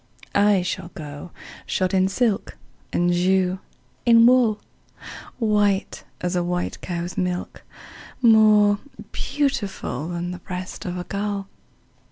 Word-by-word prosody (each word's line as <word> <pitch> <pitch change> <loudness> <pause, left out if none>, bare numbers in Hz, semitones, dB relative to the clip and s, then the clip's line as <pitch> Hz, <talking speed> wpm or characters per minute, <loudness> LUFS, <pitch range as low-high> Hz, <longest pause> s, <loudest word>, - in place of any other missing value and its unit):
I 200 -2 +4
shall 180 -1 -4
go 145 +1 -8 0.4
shod 185 0 0
in 190 0 +3
silk, 210 +1 -1 0.3
And 175 0 +2
you 185 +1 +2 0.4
in 230 -1 +6
wool, 240 -4 +4 0.8
White 210 -4 +1 0.2
as 180 0 -1
a 175 - +1
white 180 0 -3
cow's 175 0 -4
milk, 180 -1 -3 0.6
More 215 -3 +5 0.3
beautiful 260 - -2
Than 175 0 -4
the 180 - -7
breast 185 +3 -7
of 180 -1 -3
a 180 - -4
gull. 200 0 -3
190 Hz, 120 wpm, -23 LUFS, 180-210 Hz, 0.8 s, in